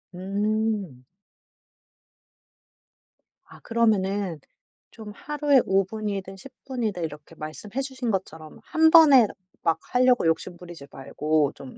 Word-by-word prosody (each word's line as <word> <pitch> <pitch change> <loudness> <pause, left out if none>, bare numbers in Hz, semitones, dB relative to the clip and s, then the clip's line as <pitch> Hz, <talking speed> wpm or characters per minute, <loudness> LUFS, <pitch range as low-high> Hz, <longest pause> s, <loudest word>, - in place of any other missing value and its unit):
음. 200 - -2 2.4
아 - - -16
그러면은 200 -6 0 0.5
좀 220 -2 -10
하루에 295 -3 +2
5 195 0 +2
분이든 195 -1 -5
10 270 +7 -13
분이든 225 -9 -3
이렇게 150 +1 -8
말씀해 200 +12 -6
주신 260 -3 -4
것처럼 160 -5 -5
1 320 0 +3
번에 290 -9 +7 0.4
막 165 -1 +2 0.2
하려고 250 -4 +3
욕심부리지 170 -2 -4
말고 150 +2 -1
좀 135 -2 -12
200 Hz, 210 characters per minute, -25 LUFS, 165-235 Hz, 2.4 s, 번에